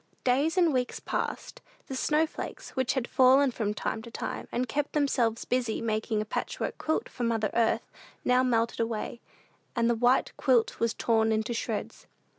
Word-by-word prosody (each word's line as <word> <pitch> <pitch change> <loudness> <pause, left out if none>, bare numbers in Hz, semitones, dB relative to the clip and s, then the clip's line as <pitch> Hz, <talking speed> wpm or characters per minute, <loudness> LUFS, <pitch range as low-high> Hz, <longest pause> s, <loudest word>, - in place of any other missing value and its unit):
Days 280 +7 +2
and 340 -4 +4
weeks 250 -1 -1
passed. - - -4 0.2
The 265 - -6
snowflakes, 310 +4 -1
which 260 -1 0
had 250 -3 -1
fallen 265 +1 +5
from 215 -3 -1
time 220 - -2
to 235 - -10
time, - - -5
and 250 +1 -1
kept 285 +4 -2
themselves 245 -6 +1
busy 245 -3 0
making 220 -1 -1
a - - -12
patchwork - - -3
quilt 315 - -1
for - - -9
mother 225 -3 +1
Earth, 230 -1 +1 0.4
now 250 0 +4
melted 235 -2 +1
away, 230 +1 -2 0.5
and 235 -1 +2
the 235 - +3
white 245 +3 +2
quilt 245 -4 +2
was 230 -1 +1
torn 225 -1 +2
into 220 +2 0
shreds. 230 - -4
240 Hz, 170 wpm, -28 LUFS, 225-260 Hz, 0.5 s, fallen